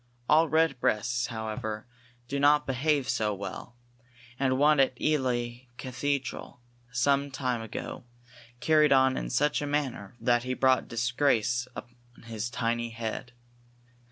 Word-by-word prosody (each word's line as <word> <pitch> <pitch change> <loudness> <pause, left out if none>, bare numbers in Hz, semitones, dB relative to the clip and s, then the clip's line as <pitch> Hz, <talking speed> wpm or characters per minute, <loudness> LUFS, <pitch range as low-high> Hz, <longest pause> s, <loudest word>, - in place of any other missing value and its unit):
All 160 +1 +5
redbreasts, 125 -6 +1
however, 110 -1 -4 0.4
do 140 +3 -2
not 150 +1 +4
behave 140 +1 +1
so 105 -2 0
well, 100 +5 -7 0.6
and 130 -1 +2
one 150 +1 +4
at 130 -2 +2
Ely 125 -4 -1
cathedral 130 0 -3 0.3
some 140 +3 +2
time 130 -3 -2
ago 110 +2 -6 0.5
carried 155 0 +4
on 130 -1 +5
in - - -3
such 150 - +1
a 145 - -2
manner 135 -8 -2
that 120 -1 +2
he 130 +1 -3
brought 130 0 +3
disgrace 120 0 +1
on 120 0 -13
his 115 0 -4
tiny 120 0 -1
head. 115 +1 -5
125 Hz, 125 wpm, -28 LUFS, 120-140 Hz, 0.6 s, All